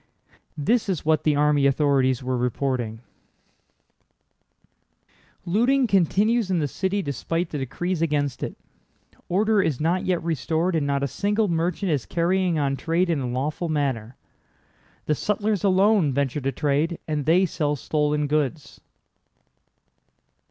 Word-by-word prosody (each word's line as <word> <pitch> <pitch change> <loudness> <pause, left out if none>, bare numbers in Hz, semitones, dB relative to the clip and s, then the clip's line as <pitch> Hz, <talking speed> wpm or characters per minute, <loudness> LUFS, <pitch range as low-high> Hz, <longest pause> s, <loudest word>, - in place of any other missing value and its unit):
This 215 +8 +1
is 180 -6 -2
what 155 -1 +3
the 150 -2 +2
army 145 -1 +3
authorities 135 -2 +2
were 130 0 -1
reporting: 125 -2 -2 2.4
"Looting 245 +9 +2
continues 205 +2 +2
in 185 - +1
the 150 -3 0
city 190 +6 -2
despite 165 +5 -2
the 150 - -3
decrees 165 +7 -3
against 145 -4 -1
it. - - -5 0.7
Order 210 +3 +2
is 155 -8 -1
not 170 +4 0
yet 180 -3 -1
restored 165 +3 -1
and 150 -3 0
not 140 0 0
a - - +1
single 205 - 0
merchant 170 +3 -1
is 140 -5 -1
carrying 175 0 +1
on 140 -2 0
trade 170 +4 0
in 160 - 0
a 125 -2 -3
lawful 150 +7 -2
manner. 135 -6 -2 0.9
The 150 - +1
sutlers 210 +4 -1
alone 195 -5 +3
venture 140 +1 -1
to 135 +1 -1
trade, 150 +4 0
and 150 -2 -2
they 180 +4 +4
sell 150 -3 -1
stolen 150 +1 0
goods." 150 0 -2
155 Hz, 140 wpm, -24 LUFS, 140-185 Hz, 2.4 s, they